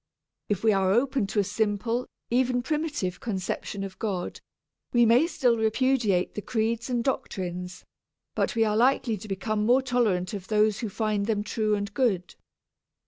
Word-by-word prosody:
If 205 -1 -1
we 220 -1 +5
are 190 -1 +2
open 255 0 +2
to 210 - -1
a - - +4
simple, 220 +4 -1 0.2
even 245 0 +2
primitive, 295 - -2
conception 195 -1 -3
of 195 0 -8
God, 195 -5 -3 0.5
we 240 -1 +5
may 240 +8 +5
still 250 -7 +2
repudiate 220 -4 +1
the 210 - -4
creeds 230 +1 -1
and 240 -2 0
doctrines, 180 -8 -3 0.5
but - - -1
we 225 - +4
are 210 -1 +1
likely 245 0 +3
to 210 - -10
become 210 +2 -1
more 250 +4 +4
tolerant 220 -8 +1
of 195 -2 -6
those 215 -1 +2
who 225 - -3
find 210 -1 -1
them 210 -2 0
true 215 0 0
and 205 0 -4
good. 200 -9 0
220 Hz, 165 wpm, -27 LUFS, 200-245 Hz, 0.5 s, we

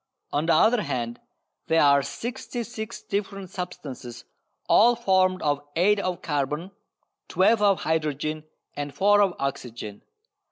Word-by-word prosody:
On 150 +3 0
the 165 - +4
other 225 +7 +4
hand, 120 - -3 0.5
there 165 -1 +4
are 140 -1 +5
sixty 240 - -5
six 225 0 -7
different 195 -2 -4
substances 140 -10 -7 0.4
all 240 +3 +6
formed 185 -4 +2
of 145 -1 +1
eight 200 +5 +3
of 185 -3 -3
carbon, 150 +4 -2 0.6
twelve 210 +4 +3
of 200 -2 +3
hydrogen 155 -1 -1 0.3
and 145 -1 -5
four 205 +1 +4
of 195 -3 +2
oxygen. 120 -6 -5
175 Hz, 130 wpm, -25 LUFS, 145-205 Hz, 0.6 s, all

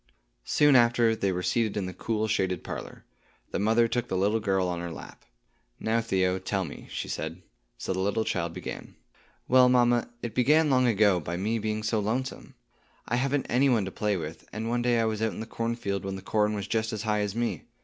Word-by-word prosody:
Soon 150 -2 +5
after, 120 -2 +4
they 100 -3 0
were 90 0 -3
seated 110 +3 0
in 100 - -1
the 90 - -5
cool 110 +4 -1
shaded 95 -4 0
parlor. - - -7 0.5
The - - -1
mother 115 +3 +3
took 120 +1 -1
the 95 - -1
little 105 +4 +2
girl 95 -3 +1
on 90 -1 -2
her 85 0 -4
lap. - - -11 0.5
"Now, 115 +1 +1
Theo, 95 -4 +1
tell 95 0 -2
me," 70 - -9
she - - -4
said. 80 +3 -5 0.3
So 95 - -3
the 95 - -3
little 100 +3 0
child 85 -2 -1
began. - - -7 0.5
"Well, 125 0 +6
mamma, 120 -1 +3
it 120 -3 -4
began 150 +5 +4
long 130 -1 +4
ago, 105 -4 +4
by 85 +2 -4
me 110 +5 -1
being 110 0 -2
so 110 0 +1
lonesome. 125 +6 -3 0.5
I 120 - 0
haven't 135 +2 0
any 135 +3 +3
one 115 -6 +2
to 95 - -5
play 105 0 0
with, 80 -1 -7
and 110 +1 -4
one 120 0 0
day 120 -1 +2
I 115 - +2
was 110 -1 -2
out 110 -1 0
in - - -8
the 110 - -4
cornfield 115 -4 -3
when 95 0 -4
the 95 - -8
corn 105 0 +1
was 100 -2 -3
just 110 +2 -1
as 105 -1 -3
high 105 -1 +1
as 105 0 -2
me. 120 0 -2
110 Hz, 220 wpm, -27 LUFS, 95-120 Hz, 0.5 s, Well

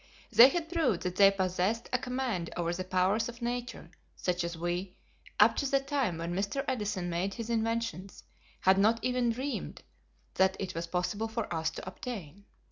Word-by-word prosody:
They 245 +3 +9
had 325 +2 -3
proved 285 - +1
that 180 0 -2
they 195 -1 +8
possessed 190 +3 -1
a 255 - +3
command 250 -9 -2
over 170 0 0
the 185 +1 -3
powers 185 +5 +1
of 235 0 -10
nature 245 +1 -4 0.2
such 180 -1 -1
as 170 0 -4
we, 175 +2 -3 0.4
up - - +6
to 280 - 0
the 275 - +3
time 275 - -1
when 170 +1 -3
Mr. 200 +9 -1
Edison 210 -8 -2
made 175 +3 -2
his 230 -1 -5
inventions, 225 -4 -2 0.4
had 190 +1 +5
not 220 +3 +4
even 250 -1 +1
dreamed 260 +5 -4 0.5
that 190 0 +2
it 195 - -4
was 165 +1 -4
possible 185 +6 -1
for 225 -4 -3
us 160 -1 0
to 160 - -9
obtain. 200 -3 -7
200 Hz, 180 wpm, -30 LUFS, 180-240 Hz, 0.5 s, They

